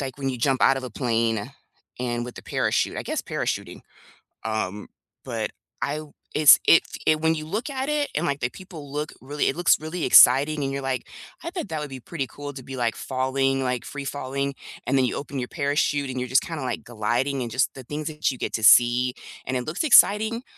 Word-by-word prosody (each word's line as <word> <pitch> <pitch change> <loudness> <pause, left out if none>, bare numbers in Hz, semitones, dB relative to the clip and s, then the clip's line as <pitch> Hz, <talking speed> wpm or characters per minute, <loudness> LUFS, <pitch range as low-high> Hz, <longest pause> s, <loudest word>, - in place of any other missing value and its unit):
like, 135 -1 -5
when 135 -1 -2
you 130 -2 -3
jump 130 +2 +1
out 135 - +5
of 135 - -4
a 125 - -6
plane 115 -1 -1 0.5
and 120 -1 -2
with 125 - -8
the - - -9
parachute, - - 0
I - - -3
guess - - -3
parachuting, - - -3 0.7
um, 105 -2 -3 0.4
but - - -3 0.3
I 145 - -1
w 155 -1 -9 0.2
it's 150 -2 +8
it 165 - +7 0.2
it 155 0 +3
when 160 0 +3
you 155 -1 -5
look 215 - -3
at 265 0 -3
it, 300 -1 0
and, 155 - 0
like, 140 -3 -2
the 120 - 0
people 160 -4 -11
look 150 +1 -4
really 145 +3 -1
it - - -2
looks 175 -1 +4
really 160 +2 -5
exciting, 145 +4 +6
and 135 - -2
you're 140 - -3
like, 135 -1 -3 0.4
"I 335 - -3
bet 350 - -5
that 155 -1 -3
would 150 - -5
be 135 -1 -8
pretty 140 -3 -4
cool 145 +3 -8
to 130 -2 -9
be, 135 +1 -8
like, 120 -2 0
falling, 135 +1 0
like, 125 -2 -2
free 145 -1 -6
falling," 140 0 -3 0.3
and 135 +1 +2
then 130 - +3
you 125 - -2
open 140 -1 -5
your 125 - -3
parachute, 145 -2 0
and 130 0 -4
you're 125 -1 -4
just 130 - +6
kinda, 165 -3 -5
like, 130 - -3
gliding 120 +4 -1
and 120 - -3
just 125 +3 +1
the 135 - -9
things 150 +3 -5
that 150 -2 -1
you 130 - -7
get - - -3
to 110 - -2
see, 120 +3 +6 0.3
and 130 - -2
it 125 - -3
looks 155 - -2
exciting, 225 -3 +5
135 Hz, 230 wpm, -24 LUFS, 125-155 Hz, 0.7 s, it's